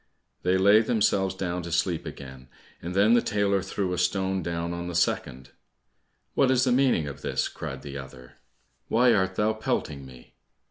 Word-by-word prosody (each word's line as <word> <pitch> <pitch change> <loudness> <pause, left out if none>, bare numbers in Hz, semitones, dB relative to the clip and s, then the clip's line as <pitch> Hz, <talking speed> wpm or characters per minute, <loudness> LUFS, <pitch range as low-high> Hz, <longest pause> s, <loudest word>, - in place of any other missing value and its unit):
They 90 +1 +2
laid 100 +4 +5
themselves 100 -4 +1
down 90 -1 -3
to 85 0 -7
sleep 85 0 0
again, 65 -1 -10 0.3
and 90 +2 -6
then 105 +4 +5
the 120 - +5
tailor 100 -2 +1
threw 95 -1 -3
a 90 - -2
stone 95 +1 0
down 85 0 -3
on 85 0 -5
the 90 - -5
second. 65 -6 -1 0.8
"What 135 - +3
is 130 -1 +3
the 130 - +2
meaning 125 - +3
of 70 - -8
this?" - - -1
cried - - -7
the 70 -1 -6
other. 65 -1 -12 0.5
"Why 120 +1 +4
art 95 -1 +1
thou 105 +2 +1
pelting 75 -9 -3
me?" 65 -1 -15
95 Hz, 180 wpm, -26 LUFS, 85-105 Hz, 0.8 s, laid